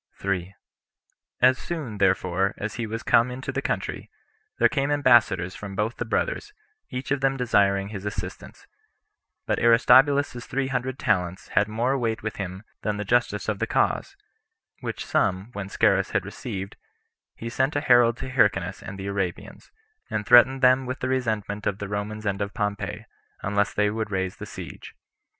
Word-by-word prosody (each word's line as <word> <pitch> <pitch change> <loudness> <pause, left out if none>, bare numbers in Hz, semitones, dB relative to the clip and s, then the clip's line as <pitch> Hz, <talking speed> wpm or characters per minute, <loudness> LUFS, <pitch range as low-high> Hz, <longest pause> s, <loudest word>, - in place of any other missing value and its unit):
3. 95 -1 -2 0.9
As 130 +1 +5
soon, 140 -12 -5
therefore, 95 0 +1
as 100 +1 -4
he 115 -2 -3
was 115 +2 -5
come 115 +2 +4
into 125 +1 -5
the - - -2
country, - - -3 0.5
there - - +5
came 140 -2 -1
ambassadors 120 -10 +3
from 100 -2 -8
both 105 +3 -1
the 120 - -3
brothers, 420 - -2 0.4
each 125 +1 -5
of 140 -1 +1
them 135 0 +2
desiring 100 -5 +2
his 100 -3 -7
assistance; 105 -1 -6 0.8
but - - 0
Aristobulus's 130 +2 +4
three 135 0 -1
hundred 130 0 -2
talents 95 - -1
had 105 - +2
more 120 +5 0
weight 115 -3 -2
with 110 - -4
him 95 0 -5 0.2
than 105 -1 -1
the 105 - -3
justice 115 -2 +1
of 105 -2 -1
the - - 0
cause; - - 0 0.6
which - - -5
sum, 95 +3 0
when 100 -1 -5
Scaurus - - +2
had - - +1
received, 95 0 -6 0.6
he 115 - -7
sent 130 +4 0
a 145 - +1
herald 120 -4 +5
to 130 - -6
Hyrcanus 100 -7 +1
and 95 - -8
the 95 - -6
Arabians, 100 -3 -4 0.4
and 105 -1 -2
threatened 130 +3 +6
them 130 0 +5
with 130 - -4
the 130 - -1
resentment 110 -5 -1
of 100 - -1
the 100 - -5
Romans 105 +1 -4
and 100 0 -1
of 100 0 -3
Pompey, 105 -2 -3 0.4
unless 100 0 +1
they 105 0 +1
would 110 0 -3
raise 95 -2 -2
the - - -8
siege. - - -9
110 Hz, 170 wpm, -25 LUFS, 100-125 Hz, 0.9 s, threatened